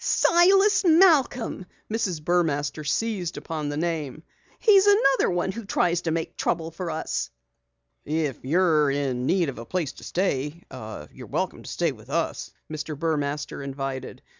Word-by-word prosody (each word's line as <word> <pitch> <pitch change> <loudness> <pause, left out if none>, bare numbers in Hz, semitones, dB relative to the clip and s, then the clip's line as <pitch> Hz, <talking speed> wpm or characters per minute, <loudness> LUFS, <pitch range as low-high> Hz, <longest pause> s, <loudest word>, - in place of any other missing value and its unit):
"Silas 390 +4 +4
Malcom!" 315 - +4 0.2
Mrs. 195 -8 -2
Burmaster 155 -3 0
seized 180 +3 -1
upon 155 -3 -4
the 145 - -3
name. 155 -3 -3 0.3
"He's 405 -3 +5
another 340 -11 +4 0.2
who 230 +4 -7
tries 175 -3 +1
to 170 - -2
make 165 0 -3
trouble 165 -1 -1
for 175 +1 -5
us!" 160 - -3 0.7
"If 150 -3 -2
you're 155 0 +3
in 135 -3 -1
need 175 -5 +2
of 130 - -7
a - - -6
place 170 -3 -2
to - - -14
stay, 180 -7 0
we'll 145 - -4
be 170 +4 -18
glad - - -9
to 110 0 -7
have 75 - -13
you - - -10 0.6
remain - - +1
with - - -17
us," - - -2 0.2
Mr. 155 -1 -5
Burmaster 145 -2 -2
invited. 135 -1 -5
165 Hz, 160 wpm, -25 LUFS, 145-195 Hz, 0.7 s, He's